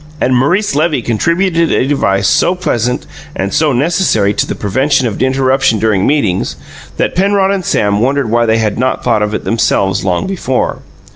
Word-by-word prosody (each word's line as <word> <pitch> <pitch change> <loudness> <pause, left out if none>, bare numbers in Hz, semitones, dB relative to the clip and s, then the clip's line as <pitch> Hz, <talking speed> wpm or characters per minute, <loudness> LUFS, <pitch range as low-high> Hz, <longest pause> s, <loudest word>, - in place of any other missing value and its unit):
And 130 - +1
Maurice 185 +11 +1
Levy 150 -4 0
contributed 170 - 0
a - - +1
device 100 -9 0
so 175 - +2
pleasant, 125 -8 -2 0.3
and 100 +1 -3
so 155 -2 +2
necessary 130 - +1
to - - -1
the - - -4
prevention 130 +6 0
of 110 -4 -3
interruption 130 -2 +1
during 105 -3 +1
meetings, 110 -11 0 0.4
that - - -1
Penrod 195 +1 +1
and 195 -2 -2
Sam 105 -8 0
wondered 135 0 0
why 120 0 +2
they 110 0 +2
had 110 -1 -1
not 130 +1 -1
thought 115 -4 +1
of 105 0 -1
it - - -4
themselves 100 -4 0
long 90 -3 -1
before. 170 -9 -2
130 Hz, 180 wpm, -13 LUFS, 110-160 Hz, 0.4 s, so